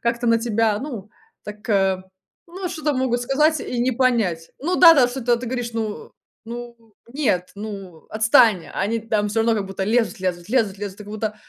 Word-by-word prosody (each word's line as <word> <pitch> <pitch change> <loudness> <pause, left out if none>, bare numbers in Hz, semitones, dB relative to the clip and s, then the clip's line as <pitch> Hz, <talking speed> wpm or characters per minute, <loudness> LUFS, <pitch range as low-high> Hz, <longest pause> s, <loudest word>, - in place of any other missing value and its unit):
как-то 235 0 -1
на 230 0 +4
тебя, 225 -2 +1
ну, 240 -8 -7 0.4
так, 210 +2 -9
э, 190 -2 +2 0.4
ну 365 +2 -6
что-то 310 -4 -2
могут 255 -2 0
сказать 300 +5 +2
и 245 -1 -3
не 255 +1 +1
понять. 225 -10 0
Ну 350 +6 -1
да 335 -2 +9
да, 255 -5 +4
что-то 245 -1 0
ты 245 - -6
говоришь: 245 -1 -3
"Ну 220 -2 -5 0.3
ну 235 -2 -10
нет, 210 - -1
ну, 200 -5 -8
отстань!" 220 -3 +4
А - - -5
они 225 +4 0
там 215 -2 -1
всё 220 +2 0
равно 225 0 +2
как 205 -3 -1
будто 195 0 -4
лезут, 220 -3 0
лезут, 180 -2 -3
лезут, 220 -7 +1
лезут, 200 -1 -6
и - - -8
как 205 - -9
будто 215 0 -3
225 Hz, 200 wpm, -22 LUFS, 205-245 Hz, 0.4 s, да